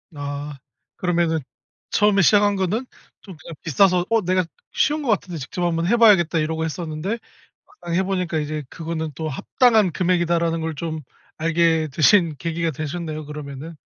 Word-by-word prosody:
아. 145 +1 -5 0.4
그러면은 170 -2 +1 0.5
처음에 205 -1 +4
시작한 205 +3 +4
거는 195 +6 -1 0.4
좀 190 -6 -12
그냥 165 - -10
비싸서 180 +2 +3
어 225 -1 +3
내가 185 0 +2 0.3
'쉬운 300 0 +1
것 250 - -3
같은데 180 -5 0
직접 175 +7 -5
한번 165 -1 0
해봐야겠다.' 200 -8 +5
이러고 160 +1 -1
했었는데 165 +6 -4 0.5
막상 175 -1 -6
해보니까 185 -3 0
이제 150 0 -3
그거는 160 -1 -4
또 160 -1 -3
'합당한 215 - +3
금액이다.'라는 170 -1 +1
걸 160 -1 -3
좀 160 +1 -4 0.4
알게 165 -1 +2
되신 165 0 +4
계기가 165 -1 -1
되셨네요 155 +1 -5
그러면은. 150 +1 -8
170 Hz, 355 characters per minute, -22 LUFS, 155-185 Hz, 0.5 s, 해봐야겠다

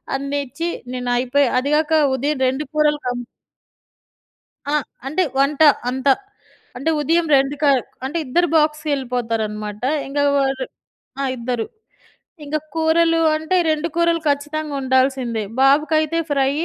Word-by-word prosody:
అన్ని 280 +1 -2
ఇచ్చి, 330 +7 -4 0.2
నేను 250 -1 -3
అయిపోయి 260 +3 +2
అదిగాక 300 +4 +1 0.2
ఉదయం 285 +3 -1
2 265 +3 -1
కూరలు 300 -1 +2
కమ్ 245 0 -2 1.5
ఆ! - - +2 0.3
అంటే 310 +7 0 0.2
వంట 280 +2 +2 0.3
అంత. 265 +2 -1 0.7
అంటే 275 +6 -1
ఉదయం 330 +3 +2
2 270 +2 +1
క - - +3 0.4
అంటే 290 +6 -2
ఇద్దరు 345 +7 +2
బాక్స్‌కెళ్ళిపోతారనమాట. 245 -9 -1 0.3
ఇంక 285 +1 -4 0.2
వాళ్ళు 270 -1 0 0.6
ఆ! - - 0
ఇద్దరు. 235 -1 -2 0.8
ఇంక 295 +2 -1 0.2
కూరలు 330 +1 +3 0.2
అంటే 315 +4 -1
2 310 +1 0
కూరలు 335 -1 +2
ఖచ్చితంగా 295 +1 -2
ఉండాల్సిందే. 260 -3 +1 0.2
బాబుకైతే 310 +3 +3
ఫ్రై, 275 -1 +2
285 Hz, 120 wpm, -20 LUFS, 260-310 Hz, 1.5 s, క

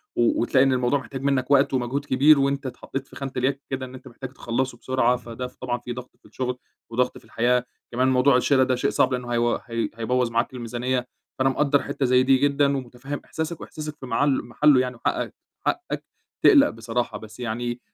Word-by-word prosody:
و 120 -1 +2
وتلاقي 130 +2 +4
إن 135 -1 +3
الموضوع 125 +3 +2
محتاج 135 0 -7
منّك 135 -1 0
وقت 140 0 +4
ومجهود 130 +3 -1
كبير 140 +2 +5
وأنت 140 0 0
اتحطّيت 135 +1 -5
في - - -16
خانة 135 -1 -5
الياك 135 +2 0
كده، 130 -1 -3
إن 130 0 -11
أنت 130 +1 -12
محتاج 130 +1 -8
تخلّصه 125 0 -2
بسرعة، 125 -1 +1
فده 120 +1 -6
ف 125 - -18
طبعًا 120 -1 -3
في 120 0 -6
ضغط 125 +1 -9
في - - -32
الشُغل 125 -1 -3 0.3
وضغط 125 +2 0
في - - -16
الحياة. 125 +1 +1 0.3
كمان 125 +2 +2
موضوع 130 0 +4
الشِرا 130 +1 +3
ده 130 0 +1
شيء 125 - 0
صعب، 130 - +2
لإنه 125 -1 -3
هيو 120 0 +2
هي 115 -1 -2
هيبوّظ 120 +1 0
معاك 115 +3 0
الميزانيّة. 125 +1 -2 0.3
فأنا 135 0 +4
مقدّر 140 +1 +2
حتّة 135 - -2
زي 125 0 +4
دي 135 0 +5
جدًا 140 0 +2
ومُتفهِّم 130 +3 -6
إحساسك 160 +1 -4
وإحساسك 150 -1 -7
في - - -8
معل 135 +4 +2
مَحلُّه 140 +3 +4
يعني 125 -1 -3
وحقّك - - -2 0.3
حقّك 360 - -2 0.4
تقلَق 290 -8 +7
بصراحة. 115 -1 -3
بس 110 +3 -12
يعني 120 0 -2
أنا 120 - -7
130 Hz, 205 wpm, -24 LUFS, 120-135 Hz, 0.4 s, تقلَق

